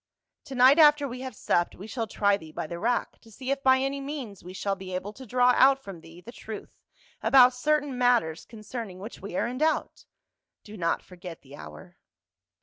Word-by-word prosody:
To 270 - -8
night 260 +5 +6
after 295 -2 +6
we 250 0 -7
have 260 -3 -7
supped, 175 -3 0
we 195 - -10
shall 225 0 -4
try 200 -1 +2
thee 160 -5 -10
by - - -5
the 170 +2 -7
rack 235 +4 -1
to 225 - -19
see 260 +4 -5
if 275 0 -1
by 260 -1 +5
any 275 +1 -2
means 275 - -7
we 180 - -9
shall 195 +1 -2
be 185 -1 -7
able 200 +3 -5
to 260 +3 -12
draw 250 +2 +4
out 270 +1 +6
from 190 -5 -9
thee 165 +2 -14
the 235 - -11
truth 220 -3 -10 0.4
about 255 -2 +6
certain 290 +1 0
matters 240 -10 +2
concerning 220 -3 -8
which 205 +5 -9
we 195 -2 -7
are - - +1
in 250 +2 -4
doubt. 315 +1 -1 0.6
Do 210 - -11
not 170 -4 -1
forget 180 -2 -11
the 140 +1 -13
hour." 75 0 -12
230 Hz, 210 wpm, -27 LUFS, 185-260 Hz, 0.6 s, night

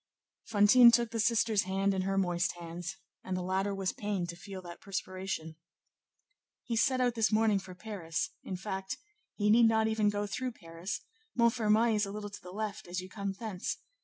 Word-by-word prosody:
Fantine 225 +3 +7
took 235 -1 +3
the 230 - -2
sister's 220 -2 +3
hand 195 +1 +1
in 190 - 0
her 195 +1 -1
moist 175 -2 +1
hands, 170 0 -6 0.3
and 185 -1 -2
the 180 - -3
latter 190 +2 0
was 195 -1 -1
pained 200 -5 -2
to 170 - -5
feel 190 +2 -8
that 175 -1 -10
perspiration. 185 -4 -4 1.1
"He 235 - -2
set 255 +3 +3
out 245 -1 +2
this 225 -1 +2
morning 215 -2 +3
for 185 -1 -10
Paris; 180 -5 -3
in 190 - -4
fact, 190 0 -4 0.4
he 210 0 +2
need 230 +1 +7
not 220 0 +3
even 220 -1 +2
go 205 0 -1
through 250 +4 -3
Paris; 170 +1 -6 0.4
Montfermeil 230 -1 +4
is 210 -1 +1
a - - -5
little 205 0 -6
to - - -9
the 180 - -10
left 215 +1 -4
as 180 +1 -3
you 185 0 -8
come 200 0 -3
thence. 200 -3 -4
200 Hz, 190 wpm, -31 LUFS, 185-220 Hz, 1.1 s, Fantine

